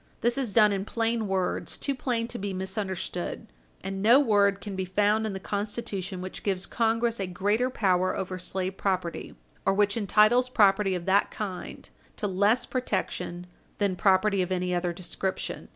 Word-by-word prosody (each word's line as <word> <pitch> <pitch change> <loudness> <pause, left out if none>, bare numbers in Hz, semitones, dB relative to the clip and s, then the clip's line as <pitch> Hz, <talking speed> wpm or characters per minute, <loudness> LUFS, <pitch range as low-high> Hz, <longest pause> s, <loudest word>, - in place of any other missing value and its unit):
This 240 +1 +2
is 260 -6 -2
done 210 0 +5
in 195 -1 -1
plain 225 0 -1
words 190 -1 -1
too 280 - -1
plain 240 -3 -1
to 240 - -5
be 200 0 -3
misunderstood. 190 -1 -4 0.4
And 195 0 -4
no 235 +6 +7
word 200 -6 +3
can 200 -1 -6
be 190 - -2
found 210 +4 +1
in 210 - -4
the 190 - -4
Constitution 200 -2 -4
which 185 0 -6
gives 195 -2 -1
Congress 230 0 0
a 195 - -2
greater 205 +7 0
power 185 -6 +1
over 185 -1 -4
slave 185 +1 -3
property 185 -3 -2 0.3
or 195 - +2
which 205 0 +2
entitles 215 +4 +4
property 200 -4 +3
of 175 -1 -5
that 195 +1 +3
kind 195 -4 -6 0.3
to - - -3
less 205 +5 +2
protection 180 -8 -3 0.3
that 200 -3 +1
property 195 0 +3
of 180 0 -2
any 180 0 0
other 175 0 0
description. 185 +2 -4
200 Hz, 170 wpm, -27 LUFS, 185-220 Hz, 0.4 s, no